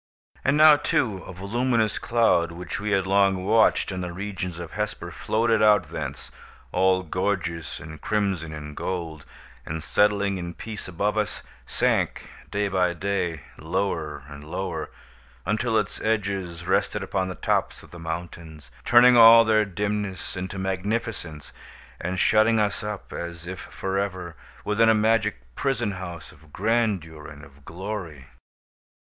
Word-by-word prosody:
And 140 +2 +3
now, 155 -1 +8
too, 110 -7 0
a - - -8
voluminous 110 +4 0
cloud, 115 -8 +2
which 90 +2 -6
we 105 +1 -3
had 95 -2 +2
long 95 -1 +2
watched 110 0 +3
in 90 -1 -4
the 90 -1 -4
regions 90 -2 -5
of 85 -2 -7
Hesper, 105 0 -4
floated 115 0 +1
out 105 -1 +4
thence, - - -6 0.4
all 95 0 +3
gorgeous 85 -2 -2
in 80 -1 -10
crimson 95 -7 -1
and 75 -1 -8
gold, 80 -5 -4 0.4
and 80 0 -5
settling 100 -1 +2
in 85 0 -6
peace 110 -3 -7
above 100 +5 -1
us, 105 - -3 0.2
sank, - - 0 0.2
day 105 0 0
by 90 -2 +1
day, 90 -4 -2 0.2
lower 80 -3 -2
and 70 0 -10
lower, 90 +5 -4 0.6
until 110 +4 +1
its 105 -2 -2
edges 100 -6 -2
rested - - +1
upon 95 -1 -1
the 90 - -5
tops - - -1
of - - -16
the 85 - -10
mountains, 80 -2 -7
turning 125 +1 +7
all 115 0 +9
their 110 -1 +3
dimness 100 -1 -3
into 95 +1 -5
magnificence, 95 -4 -3 0.5
and 90 +1 -3
shutting 110 +3 +4
us 105 -1 0
up, 105 -1 -6
as 85 0 -6
if 90 +1 -6
forever, 95 -4 -3 0.3
within 110 +2 +3
a 110 - +5
magic 110 - +2
prison 120 - -1
house 85 -6 -7
of 75 0 -20
grandeur 100 -8 -1
and 75 0 -11
of 70 +1 -19
glory. 85 -5 -6
95 Hz, 145 wpm, -25 LUFS, 85-105 Hz, 0.6 s, all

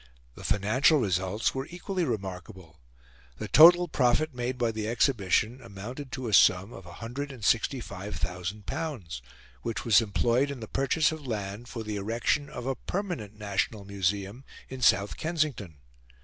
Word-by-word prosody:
The - - -12
financial 110 +10 +3
results 95 -1 0
were 135 +2 -4
equally 180 +1 -3
remarkable. 95 - -6 0.6
The - - -5
total 175 +3 +8
profit 145 +2 +1
made 125 +1 -3
by 120 -2 +1
the 110 -1 -4
Exhibition 115 0 +1
amounted 125 +8 -8
to 130 -2 -4
a 110 - -3
sum 95 +3 +5
of 95 - -11
L165,000, 105 - -3 0.4
which 115 - -4
was 115 -1 +6
employed 120 +5 +1
in 140 -2 -5
the 110 - -7
purchase 135 +6 +1
of 155 -3 -7
land 105 0 -4
for 115 -2 -6
the 105 -1 -4
erection 115 +8 -1
of 125 -5 -7
a 135 - 0
permanent 175 - -4
National 100 0 -2
Museum 100 +4 -2 0.3
in 130 -1 -7
South 100 -3 +3
Kensington. 150 - -2
115 Hz, 140 wpm, -28 LUFS, 100-135 Hz, 0.6 s, total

